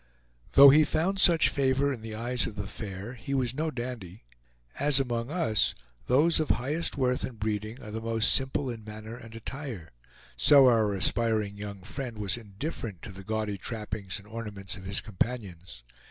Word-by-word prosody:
Though 140 0 +10
he 155 +2 +6
found 175 +6 +1
such 170 -3 +6
favor 140 +1 +1
in 120 - -8
the 110 -1 -7
eyes 120 +2 0
of 105 - -8
the 100 - -4
fair, 100 +2 -6
he 130 +3 -5
was 125 -3 0
no 155 +4 -1
dandy. 120 - -7 0.6
As 140 0 +5
among 120 -2 -2
us 150 - +1 0.3
those 155 +7 +4
of 155 - -1
highest 145 +8 0
worth 125 -2 0
and 120 -4 -6
breeding 110 +2 -3
are 105 -5 -9
most 115 0 +2
simple 135 +1 0
in 115 -2 -8
manner 110 +1 -9
and 115 -2 -12
attire, 115 - -7 0.4
so 140 -2 +6
our 115 -4 +4
aspiring 105 +1 +1
young 100 -2 -8
friend 120 +2 -6
was 100 -3 0
indifferent 110 - -6
to - - -7
the 95 +1 -10
gaudy 105 -1 -3
trappings 105 -3 -4
and 105 0 -13
ornaments 105 -4 -4
of 95 - -11
his 95 +1 +1
companions. 95 - -5
115 Hz, 175 wpm, -28 LUFS, 105-130 Hz, 0.6 s, Though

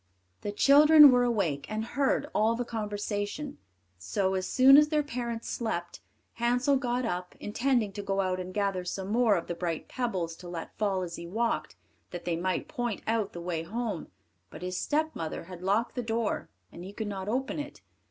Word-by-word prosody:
The 205 - -3
children 295 +5 +8
were 245 -1 +4
awake, 195 - 0
and 215 +1 -2
heard 275 +3 0
all 220 +2 +3
the 245 +1 -2
conversation; 210 +4 -4 0.4
so, 190 - -1
as 185 -1 -1
soon 265 +1 +7
as 300 +1 +7
their 300 -1 +2
parents 235 -4 -4
slept, 175 -7 -3 0.4
Hansel 245 +4 +3
got 250 -1 -1
up, 180 -4 -4
intending 235 0 0
to 205 - -5
go 195 0 -1
out 185 -1 0
and 185 0 -5
gather 195 -2 -1
some 190 +2 -4
more 225 -1 +4
of 170 - -2
the - - -3
bright 170 -2 -3
pebbles 185 -10 -2
to 180 - -10
let 170 -2 -7
fall 195 -3 0
as 170 -1 -6
he 170 - -7
walked, 230 +6 -1 0.3
that 175 - -7
they 175 -1 0
might 185 +2 -1
point 240 -4 -3
out 220 -3 0
the 175 - -6
way 170 -2 -2
home; 215 +1 -4 0.4
but 170 - -10
his 180 0 -3
stepmother 295 - -2
had 180 0 -10
locked 200 +5 +1
the 250 - -2
door, 225 -1 -2 0.2
and 175 - -10
he 195 +2 -8
could 220 - -4
not 195 -1 -4
open 265 +6 -1
it. 290 - -7
210 Hz, 190 wpm, -29 LUFS, 185-245 Hz, 0.4 s, children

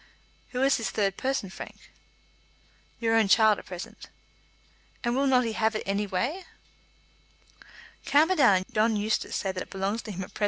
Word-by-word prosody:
"Who 250 +1 -1
is 275 0 +4
the 230 - -5
third 195 -1 0
person, 260 -7 -2
Frank?" - - -11 1.1
"Your 225 -1 +1
own 225 -2 +4
child 215 +1 +5
at - - -14
present." 180 -1 -9 0.9
"And 240 0 0
will 275 +1 +2
not 250 -2 +4
he 225 - -2
have 220 0 0
it - - -2
any 200 +1 -1
way?" 245 - -2 1.6
"Camperdown 290 - +4
and 185 0 -3
John 220 +1 +2
Eustace 210 +1 -1
say 195 - -1
that 185 -1 -5
it - - -7
belongs 195 +4 -2
to 215 - -8
him 190 -1 -5
at - - -12
present. - - -10
220 Hz, 180 wpm, -27 LUFS, 195-250 Hz, 1.6 s, child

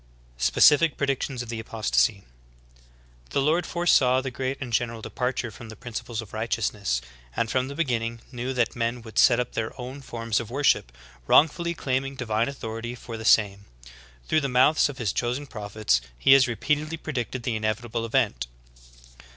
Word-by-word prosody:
^ - - -11
SPECIFIC 150 - +5
PREDICTIONS 135 -2 -1
OF 120 - -11
THE 115 -1 -4
APOSTASY. 105 - +1
19. 100 -1 -19 1.0
The - - 0
Lord 160 +5 +2
foresaw 135 -7 +3
the 130 0 -4
great 130 +2 -3
and 130 -4 -6
general 115 -1 0
departure 125 +1 -3
from 110 +2 -11
the 110 - -9
principles 115 0 -5
of 105 - -16
righteousness, 105 - -1 0.3
and 115 -1 0
from 130 0 +1
the 140 - -7
begin 135 -7 +1
ning 115 0 -5
knew 125 0 -3
that 125 -3 0
men 115 0 -2
would 110 -1 -3
set 120 -2 +6
up 125 - -2
their 115 +3 -4
own 130 +3 -7
forms 115 -4 -2
of 115 - -6
wor 140 +4 -3
ship, - - +3 0.4
wrongfully 170 +3 +4
claiming 135 -1 -2
divine 115 -1 0
authority 115 -2 -6
for 115 -1 -8
the 110 - -7
same. 100 -3 +3 0.6
Through 155 - +2
the 140 - -1
mouths 130 +5 +4
of 140 - -8
His 110 -8 -1
chosen 125 +4 -1
prophets 105 - -1 0.2
He 135 - +6
has 135 -2 +6
re 120 - -2
peatedly 150 +7 -1
predicted 130 -5 -4
the 120 -2 -1
inevitable 110 +2 -2
event. 110 - 0
120 Hz, 185 wpm, -26 LUFS, 110-135 Hz, 1.0 s, set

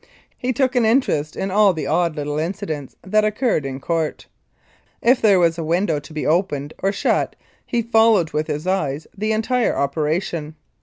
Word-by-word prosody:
He 250 - -2
took 260 +1 0
an 245 - +3
in:erest 220 - +1
in 195 - -3
all 205 -1 +5
the 155 -4 -4
odd 165 +2 +1
little 145 0 -3
incidents 155 -4 -4
that 215 +4 +2
occurred 210 - 0
in 135 0 -5
ccurt. 165 +1 -2 0.7
If 250 +2 +3
there 205 -4 +5
were 170 -1 +4
a 165 - -4
window 165 -1 +1
to 145 - -14
be 155 -1 -4
opened 155 -3 0
or 195 - +1
shut 200 - 0 0.3
he 235 -1 0
followed 225 -6 +3
with 150 +1 -1
his 150 +1 -3
eyes 155 -6 -1
the 215 +2 -1
entire 225 +2 +1
operation. 155 +2 -1
170 Hz, 175 wpm, -21 LUFS, 150-215 Hz, 0.7 s, all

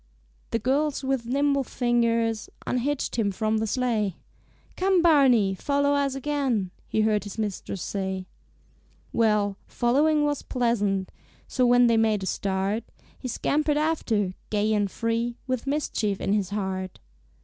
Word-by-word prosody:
The - - 0
girls 280 +4 0
with 265 -3 -1
nimble 280 +2 +2
fingers 230 -3 0 0.2
Unhitched 255 0 -1
him 205 -3 +2
from 215 +3 0
the 220 - -1
sleigh; 215 -5 0 0.6
"Come, 375 -2 +2
Barney! 260 - +5
Follow 285 +7 +1
us 280 -1 +1
again," 270 -9 -1 0.2
He 220 - +1
heard 215 -2 +2
his 205 0 -8
mistress 200 -4 -3
say. 190 -2 -3 0.9
Well, 210 -3 +2
following 295 +5 +2
was 290 -1 0
pleasant, 205 -6 0 0.4
So, 255 -2 +2
when 245 0 +6
they 230 -1 +4
made 215 -3 +2
a - - -2
start, 195 +3 -1 0.4
He - - -5
scampered 295 +4 0
after, 235 - 0 0.2
gay 215 +1 +1
and 205 -2 +1
free, 230 +3 -2
With 255 0 -3
mischief 230 -8 -1
in 195 - 0
his 200 -3 0
heart. 190 -2 -3
230 Hz, 140 wpm, -26 LUFS, 205-275 Hz, 0.9 s, when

